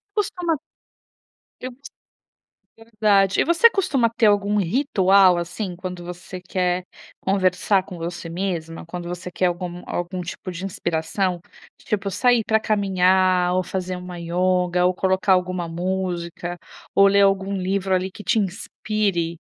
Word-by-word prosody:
Costuma 355 -6 -1 1.0
eu 255 - -3
gos 275 +3 -14 0.9
verdade. 210 -4 +2
E - - +4
você 340 +7 +6
costuma 305 - +1
ter 225 - +4
algum 205 0 +2
ritual 195 - +4
assim, 175 +2 -4
quando 180 -1 -7
você 180 +1 -8
quer 180 0 -1 0.4
conversar 190 +1 +2
com 185 -2 -10
você 170 0 -5
mesma? 165 -2 -4
Quando 175 +1 -6
você 180 +1 -6
quer 180 +1 +1
algum 175 0 -4
algum 175 +1 -3
tipo 180 +1 -6
de 180 +1 -7
inspiração? 175 0 -2 0.4
Tipo 200 -2 -2
sair 240 +4 +3
pra 220 0 +3
caminhar, 185 -3 +2
ou 185 - +1
fazer 185 0 -4
uma 180 -1 -8
ioga, 180 +1 +1
ou 180 - +3
colocar 190 +1 +2
alguma 180 -1 0
música, 175 0 -3 0.4
ou 200 0 +6
ler 200 0 +4
algum 195 0 +2
livro 190 0 0
ali 185 +1 -1
que 210 - -11
te 230 - +1
inspire, 195 -3 -1
185 Hz, 140 wpm, -22 LUFS, 180-200 Hz, 1.0 s, você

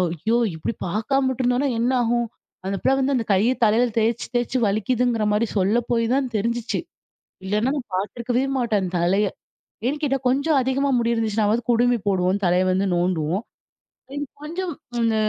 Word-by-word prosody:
ஐயோ! 220 +9 0 0.2
இப்பிடி 160 +8 -3
பார்க்காம 260 +8 0
விட்டுருந்தோன்னா 255 +2 +1
என்ன 240 +2 +2
ஆகும் 235 0 +1 0.4
அந்த 195 - -1
பிள்ளை 270 - +3
வந்து 270 +1 +1
அந்த 235 -3 -1
கைய 215 +7 +3
தலையில 230 +3 +3
தேய்ச்சு, 230 +1 0
தேய்ச்சு 240 +1 0
வலிக்குதுங்குற 225 +2 +1
மாரி 210 +2 +2
சொல்ல 200 +4 +2
போய் 230 -1 +2
தான் 275 -1 +1
தெரிஞ்சுச்சு. 235 +3 -1 0.7
இல்லன்னா 210 +6 0
நான் 260 -5 -5
பார்த்துருக்கவே 240 +6 -1
மாட்டேன் 215 -6 0
தலைய. 190 +5 +2 0.6
ஏன் 290 - 0
கேட்டா 275 -2 +1
கொஞ்சம் 280 +4 +2
அதிகமா 265 +2 0
முடி 235 0 +1
இருந்துச்சுனாவது 220 0 +1
குடுமி 240 +1 +3
போடுவோம், 185 0 +2
தலைய 180 +1 +3
வந்து 190 +2 +1
நோண்டுவோம். 175 +2 0 0.7
இது 290 0 -3 0.2
கொஞ்சம் 340 +2 -4 0.3
இந்த 225 -1 +2
230 Hz, 155 wpm, -23 LUFS, 205-255 Hz, 0.7 s, பிள்ளை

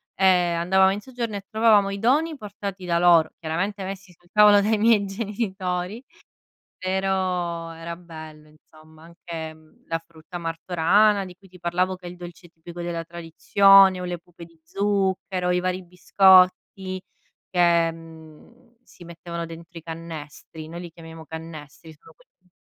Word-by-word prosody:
e 190 - +1
andavamo 180 +1 +3
in 200 - -3
soggiorno 235 -2 -5
e 200 -1 -6
trovavamo 215 -3 +3
i 200 - -5
doni 300 +9 +2
portati 200 -4 -7
da 170 -1 +1
loro, 170 -2 +5
chiaramente, 185 +5 -3
messi 190 0 -7
sul 175 0 -28
tavolo 210 -1 +6
dai 215 +1 +1
miei 215 -2 +4
genitori 195 0 -4 0.8
però 185 -3 -2
era 165 +1 -7
bello, 155 -3 -12
insomma, 155 +1 -20
anche, 165 -1 -8
mhmm, 155 0 -24
la 165 - -1
frutta 165 +2 -12
martorana 175 +5 +2
di 180 -1 -11
cui 195 +2 -21
ti 180 0 -16
parlavo, 180 +2 -1
che 180 -1 -13
è - - -6
il 180 - -11
dolce 175 0 -11
tipico 170 +1 -10
della 170 -1 -3
tradizione, 185 +3 +4
o - - -5
le 180 -1 -4
pupe 170 0 -14
di 165 -1 -21
zucchero, 190 -1 -1
i 180 - +2
vari 185 +1 -2
biscotti 185 +1 +3 0.5
che, 170 -2 +3
mhmm, 165 +9 -15
si 175 - -16
mettevano 170 0 -7
dentro 165 +1 -11
i - - -13
cannestri, 160 -1 -9
noi 170 +2 -8
li 175 - -9
chiamiamo 165 -1 -12
cannestri, 160 -1 -10
sono - - -18
quelli - - -30
180 Hz, 155 wpm, -24 LUFS, 165-195 Hz, 0.8 s, tavolo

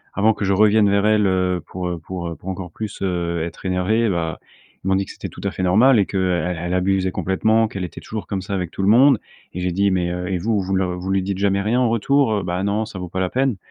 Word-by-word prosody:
avant 110 +2 +3
que 105 - -3
je 100 - +2
revienne 105 +1 +4
vers 100 +1 +2
elle, 105 -2 +3
heu, 90 -1 +1
pour, 90 -1 -4
heu, 85 -2 -4
pour, 85 +1 -6
heu, 85 - -6
pour 95 - -9
encore 90 -2 -5
plus, 105 0 -7
heu, 85 -3 -1
être 85 +3 -8
énervé, 105 +5 +1
bah, 80 -4 -2 0.4
ils - - -5
m'ont 95 - +3
dit 95 0 0
que - - -10
c'était - - -7
tout - - -12
à 100 - -1
fait - - -5
normal 110 +7 +5
et 100 - +2
qu'elle 90 -2 0
elle 85 +1 -3
abusait 95 0 +1
complètement, 110 +5 +1
qu'elle 95 -3 -5
était - - -9
toujours 110 -2 -6
comme 95 -1 -3
ça 100 +2 -6
avec 90 -3 -3
tout - - -5
le 95 - +1
monde 130 +2 +6 0.3
et 90 - -5
j'ai 90 0 0
dit: 100 +3 +2
«Mais 90 -2 0
heu 90 0 -3
et 95 -1 -1
vous, 105 +3 0
vous 95 0 -1
le 95 0 +1
vous 90 +2 -4
lui 95 0 +2
dites 95 0 -3
jamais 100 0 +1
rien 110 +5 +1
en 125 - +3
retour?» 115 -1 +2
«Bah 90 +1 -2
non, 105 +2 0
ça 105 - -9
vaut 90 -1 -6
pas 95 - -4
la 95 - 0
peine» 130 -2 0
95 Hz, 280 wpm, -21 LUFS, 90-105 Hz, 0.4 s, monde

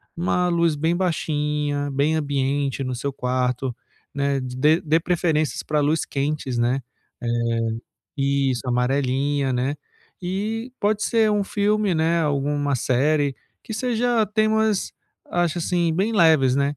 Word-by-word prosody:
uma 180 +1 +1
luz 170 -2 +2
bem 160 +4 0
baixinha, 150 -5 -1
bem 140 +3 +1
ambiente 140 -2 -1
no 130 -1 -3
seu 140 +3 -3
quarto, 125 0 -1 0.4
né? 140 0 0
D 130 -1 -6 0.2
dê - - -14
dê 160 +1 +2
preferências 165 -3 0
pra 150 0 0
luz 150 +2 +1
quentes, 140 -2 -2
né? 125 +3 +1 0.4
Eh, 120 - -4 0.9
isso, 135 -2 +1
amarelinha, 135 +2 0
né, 130 +4 -1 0.5
e 215 +7 -3
pode 210 +1 +1
ser 225 -2 +3
um 205 -1 +1
filme, 205 -1 +1
né, 165 +1 +2
alguma 145 -1 0
série 140 +3 +1 0.3
que - - -8
seja 240 -1 +1
temas, 215 -1 +1 0.4
acho, 175 -1 0
assim, 170 -1 0
bem 200 +6 0
leves, 160 -9 +4
né? 140 +1 0
150 Hz, 135 wpm, -23 LUFS, 135-180 Hz, 0.9 s, leves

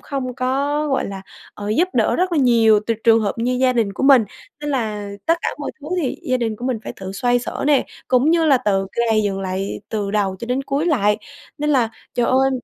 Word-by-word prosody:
không 260 -3 -4
có, 280 +4 0
gọi 270 - 0
là, 195 -1 -7 0.3
ờ, 205 0 -6
giúp 325 - +2
đỡ - - +2
rất 365 0 0
là 325 - +2
nhiều 230 -5 +5
trừ 230 - +1
trường 225 -1 +6
hợp 200 - 0
như 240 +2 0
gia 260 -1 +4
đình 225 -5 0
của - - -5
mình. 270 -4 +6 0.4
Nên 295 0 -3
là 215 -6 -2 0.2
tất 330 +1 +3
cả - - +1
mọi 290 - -4
thứ 290 - -10 0.2
thì 260 - -2
gia 255 - 0
đình 225 -3 -2
của 240 - -8
mình 250 -4 -1
phải - - -5
tự 190 0 -6
xoay 245 +4 +1
xở 245 - -5
nè, 290 -2 +3 0.2
cũng 255 +4 +3
như 335 -1 +3
là 275 -4 +5
tự 195 -4 0 0.2
gầy 215 -1 +3
dựng 195 -2 -2
lại 190 +1 -3
từ 205 -2 -2
đầu 200 -2 0
cho - - -5
đến 255 +3 -1
cuối 280 +4 -1
lại. 210 - +2 0.4
Nên 300 +1 0
là 245 -5 +2 0.2
trời 240 - +1
ơi 265 +1 +3
245 Hz, 240 wpm, -20 LUFS, 210-275 Hz, 0.4 s, trường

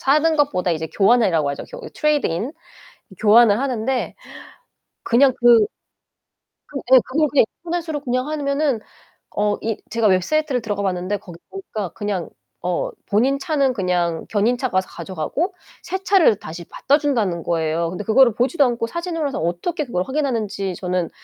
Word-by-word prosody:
사는 305 +4 +3
것보다 230 - +1
이제 160 -1 -3
교환이라고 195 -8 +3
하죠. 140 - -6
교 - - -9
트레이드 300 -1 +1
인. 210 - -3 0.7
교환을 220 0 +6
하는데 255 -1 -2 0.9
그냥 260 +3 +4
그 235 -3 +6 1.0
그 280 - -5
예 260 - +10
그걸 300 +3 +1
그냥 275 -6 +5 0.2
인터넷으로 330 -3 -3
그냥 255 0 -1
하면은 285 -3 0 0.6
어 210 0 +1
이 225 -1 -1 0.2
제가 230 0 +2
웹사이트를 255 - +1
들어가 205 -3 -3
봤는데 185 +1 -1
거기 175 -4 -12
보니까 220 - -5
그냥 205 -4 -3 0.3
어 180 0 -1 0.2
본인 250 +7 +2
차는 280 -6 +1
그냥 175 -5 -1
견인차가 235 +1 0
와서 185 - 0
가져가고 185 - -3 0.3
새 380 +1 -4
차를 365 - +4
다시 170 0 -8
갖다 285 - +2
준다는 220 - 0
거예요. 165 0 0
근데 185 +4 -5
그거를 235 +1 +5
보지도 265 +6 +2
않고 235 -2 -1
사진으로 335 0 -3
해서 - - -4
어떻게 175 - -2
그걸 180 -8 -1
확인하는지 220 -9 -2
저는 180 -1 -2
235 Hz, 355 characters per minute, -21 LUFS, 185-285 Hz, 1.0 s, 예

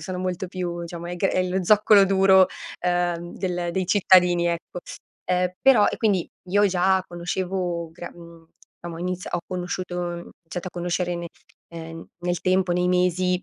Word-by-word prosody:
sono 185 -1 -5
molto 185 0 -3
più, 175 -2 -4
diciamo 170 0 -7
è 175 0 -5
che 195 - +1
è 185 - +1
lo 185 0 -1
zoccolo 210 0 +6
duro, 190 -1 +5 0.4
uhm, 175 -1 -1
del 180 -2 -2
dei 185 0 -1
cittadini, 180 -2 +4
ecco. 170 +1 -3 0.5
Ehm, 180 0 +1
però 250 -6 +6
e - - -3
quindi 200 -6 +1 0.2
io 205 +3 +4
già 190 +1 +2
conoscevo, 175 -1 -3
gran 175 +1 -9
mhmm, 170 -1 -14 0.3
diciamo, 170 -1 -7
ho - - -8
iniz 180 0 -3
ho - - -2
conosciuto 180 0 -4
ho 175 -1 -2
iniziato 175 +1 -8
a - - -16
conoscere 175 0 -2
ne 170 0 -5 0.5
ehm, 165 0 -8
nel 175 -1 -2
tempo, 185 0 +1
nei 180 0 +1
mesi, 180 0 +1
180 Hz, 175 wpm, -24 LUFS, 175-185 Hz, 0.5 s, zoccolo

